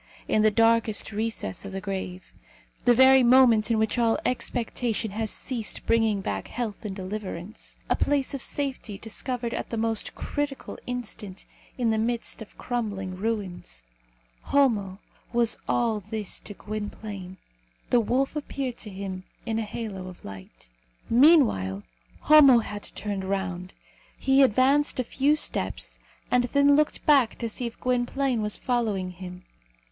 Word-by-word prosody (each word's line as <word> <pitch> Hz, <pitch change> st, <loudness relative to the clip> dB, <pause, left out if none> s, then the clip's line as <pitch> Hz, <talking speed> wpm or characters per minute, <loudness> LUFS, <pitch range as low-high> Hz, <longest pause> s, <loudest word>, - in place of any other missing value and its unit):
in 215 Hz, -, +2 dB
the 215 Hz, -, +5 dB
darkest 225 Hz, 0 st, +2 dB
recess 220 Hz, -, -3 dB
of 200 Hz, -, -7 dB
the 195 Hz, -, -4 dB
grave; 190 Hz, -2 st, -6 dB, 0.5 s
the 245 Hz, -, +6 dB
very 260 Hz, +1 st, +7 dB
moment 240 Hz, -3 st, +5 dB
in 230 Hz, -, +2 dB
which 220 Hz, +2 st, +1 dB
all 230 Hz, -1 st, +3 dB
expectation 235 Hz, -3 st, -1 dB
has 220 Hz, +1 st, -2 dB
ceased 235 Hz, -2 st, -4 dB
bringing 225 Hz, -3 st, +2 dB
back 100 Hz, -, -3 dB
health 225 Hz, -3 st, -4 dB
and 205 Hz, -3 st, -4 dB
deliverance; 190 Hz, 0 st, -6 dB
a -, -, +2 dB
place 285 Hz, -2 st, 0 dB
of 275 Hz, -, -2 dB
safety 265 Hz, -8 st, -3 dB
discovered 235 Hz, +2 st, -4 dB
at -, -, -4 dB
the 230 Hz, -, -3 dB
most 225 Hz, -1 st, -1 dB
critical 290 Hz, -2 st, -4 dB
instant 215 Hz, -6 st, -6 dB, 0.3 s
in 235 Hz, -3 st, +1 dB
the 220 Hz, -, +1 dB
midst 235 Hz, +1 st, -1 dB
of 220 Hz, -, -11 dB
crumbling 205 Hz, -6 st, -3 dB
ruins 185 Hz, -, -4 dB, 0.6 s
Homo 215 Hz, -9 st, +2 dB, 0.4 s
was 235 Hz, -1 st, +2 dB
all 230 Hz, -3 st, +1 dB
this 210 Hz, 0 st, -4 dB
to 205 Hz, -, -9 dB
Gwynplaine. 205 Hz, -3 st, -6 dB, 0.5 s
The 245 Hz, -, +5 dB
wolf 255 Hz, +6 st, 0 dB
appeared 275 Hz, -4 st, -4 dB
to 215 Hz, -, -7 dB
him 190 Hz, -1 st, -6 dB, 0.2 s
in 225 Hz, -1 st, -1 dB
a -, -, 0 dB
halo 205 Hz, -3 st, -5 dB
of 180 Hz, -1 st, -12 dB
light. 95 Hz, -12 st, -11 dB, 0.4 s
Meanwhile, 230 Hz, -, +4 dB, 0.4 s
Homo 295 Hz, -5 st, +8 dB
had 210 Hz, -2 st, -3 dB
turned 200 Hz, -2 st, -3 dB
round. 190 Hz, -2 st, -3 dB, 0.4 s
He 270 Hz, +1 st, +3 dB
advanced 270 Hz, +4 st, +3 dB
a -, -, +2 dB
few 275 Hz, +5 st, +2 dB
steps, -, -, 0 dB, 0.3 s
and 245 Hz, 0 st, +3 dB
then 280 Hz, +3 st, +4 dB
looked 300 Hz, 0 st, +1 dB
back 275 Hz, -6 st, +4 dB
to 235 Hz, -, -3 dB
see 235 Hz, +2 st, -3 dB
if 235 Hz, -, -10 dB
Gwynplaine 250 Hz, 0 st, 0 dB
was 210 Hz, -1 st, -1 dB
following 215 Hz, -7 st, -1 dB
him. 180 Hz, 0 st, -9 dB
225 Hz, 150 wpm, -26 LUFS, 195-250 Hz, 0.6 s, Homo